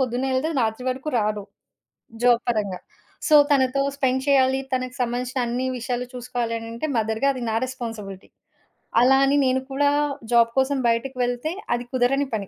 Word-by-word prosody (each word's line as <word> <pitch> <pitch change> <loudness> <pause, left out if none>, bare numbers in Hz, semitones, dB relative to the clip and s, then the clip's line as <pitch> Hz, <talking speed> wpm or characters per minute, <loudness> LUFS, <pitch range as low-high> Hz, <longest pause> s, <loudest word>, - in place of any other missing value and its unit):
పొద్దునెళ్తే 260 +4 0
రాత్రి 225 +2 -1
వరకు 265 +4 -5
రారు. 210 -1 -1 0.8
జాబ్ 240 -1 +5
పరంగా. 205 -5 -1 0.5
సో, 310 - +6 0.2
తనతో 275 -1 +3
స్పెండ్ 265 -1 0
చేయాలి. 265 -1 +4
తనకు 255 0 -2
సంబంధించిన 250 +2 -2
అన్ని 250 +2 -1
విషయాలు 245 +1 -3
చూసుకోవాలి 245 -2 -3
అననంటే 230 +6 -5
మదర్‌గా 220 +4 +1
అది 255 - -6
నా 220 - -1
రెస్పాన్సిబిలిటీ. 225 -7 -7 0.7
అలా 265 +2 +5
అని 280 +1 +2
నేను 260 0 +1
కూడా 285 +1 +2 0.4
జాబ్ 230 -1 +5
కోసం 270 +1 +1
బయటకి 245 +3 -1
వెళ్తే 245 +5 -2 0.2
అది 240 - -4
కుదరని 265 +3 +2
పని. 200 -3 -4
250 Hz, 150 wpm, -23 LUFS, 230-265 Hz, 0.8 s, సో